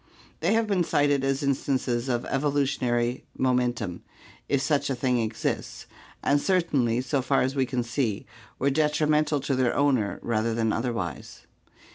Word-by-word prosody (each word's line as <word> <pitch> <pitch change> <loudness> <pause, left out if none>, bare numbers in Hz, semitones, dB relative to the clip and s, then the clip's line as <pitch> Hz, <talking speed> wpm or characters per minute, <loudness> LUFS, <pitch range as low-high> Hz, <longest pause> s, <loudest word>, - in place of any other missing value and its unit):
They 170 +7 +2
have 225 0 +2
been 195 -4 +1
cited 145 -3 +2
as 135 +1 0
instances 130 -2 0
of 120 -1 -1
evolutionary 130 -4 0
momentum, 125 -8 0 0.5
if 140 - +2
such 140 +1 0
a 135 - 0
thing 125 0 +1
exists, 110 -1 -3 0.4
and 145 0 +3
certainly, 140 -11 +1
so 130 +1 -1
far 135 +2 +2
as 130 +2 -1
we 135 -2 +1
can 125 -1 -1
see, 120 -4 -2 0.3
were 140 +2 +1
detrimental 150 0 +2
to 140 - -1
their 130 -2 +1
owner 130 -8 +1
rather 115 0 0
than 110 -2 +1
otherwise. 115 -7 -4
130 Hz, 150 wpm, -26 LUFS, 120-145 Hz, 0.5 s, and